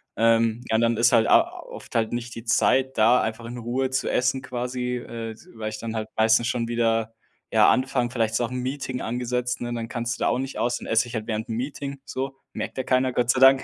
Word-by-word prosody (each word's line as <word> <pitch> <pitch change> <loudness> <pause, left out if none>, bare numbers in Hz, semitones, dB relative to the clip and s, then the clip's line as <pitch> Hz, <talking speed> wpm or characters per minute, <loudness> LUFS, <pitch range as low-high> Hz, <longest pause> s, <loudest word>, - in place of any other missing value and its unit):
Ähm, 115 +1 +3
ja, 110 - +2
und 110 - +3
dann 115 -1 +2
ist 115 +3 +4
halt 115 -2 +4
a - - +7 0.2
oft - - -11
halt 110 -1 +1
nicht 120 0 -4
die 115 +1 -9
Zeit 130 +3 +2
da, 115 +3 +5
einfach 110 +1 -3
in 120 +1 -7
Ruhe 125 +3 -1
zu 130 - 0
essen 130 +1 +1
quasi, 125 0 -3
äh, 115 -2 -6
s 110 - -18
weil 110 -1 -4
ich 110 - -6
dann 115 0 -5
halt 110 0 -3
meistens 110 +1 +4
schon 120 -2 -1
wieder 115 -1 +1 0.4
ja, - - +5
anfangen 130 -2 +1
vielleicht 115 -3 0
ist 110 - +1
auch 120 - -1
'n 125 - -3
Meeting 130 0 -3
angesetzt, 125 +1 -2
ne, 120 0 -3
dann 115 -1 -4
kannst 120 -1 -3
du - - -1
da - - +3
auch - - +2
nicht 135 +1 -4
aus. 120 +1 +1
Dann - - -9
esse 115 +2 +2
ich 120 - -7
halt 110 -1 -3
während 110 -1 -2
'm 110 - -3
Meeting, 140 +2 -4
so. 135 0 -4 0.2
Merkt - - -5
ja 130 - -1
keiner, 130 0 +1
Gott 120 -1 0
sei 130 - +3
Dank. 135 0 +7
120 Hz, 255 wpm, -25 LUFS, 115-130 Hz, 0.4 s, a